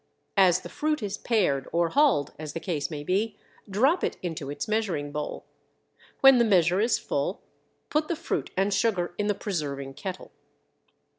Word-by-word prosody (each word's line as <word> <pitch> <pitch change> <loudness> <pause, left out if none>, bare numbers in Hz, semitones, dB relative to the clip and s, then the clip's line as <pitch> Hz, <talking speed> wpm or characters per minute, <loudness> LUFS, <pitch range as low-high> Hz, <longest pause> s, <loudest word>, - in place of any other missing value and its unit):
As 185 -3 +5
the - - -8
fruit 305 -5 -1
is 200 -1 -3
pared 180 - +1
or 170 0 +2
hulled, 270 - +3
as 155 -2 -6
the - - -3
case 165 -5 -2
may 150 -3 -5
be, 200 +7 0 0.3
drop 265 - +2
it - - -1
into 160 -5 -4
its 145 0 -4
measuring 195 -10 -1
bowl. 150 0 -5 0.8
When 270 -2 +8
the - - +6
measure 180 -4 +3
is 230 +2 +3
full - - -2 0.5
put 305 +1 +1
the 340 - -1
fruit 335 - -3
and 195 +1 +2
sugar 195 -4 +1
in 205 - +1
the 205 - +1
preserving 145 -9 -4
kettle. 185 +6 -7
190 Hz, 170 wpm, -27 LUFS, 155-225 Hz, 0.8 s, When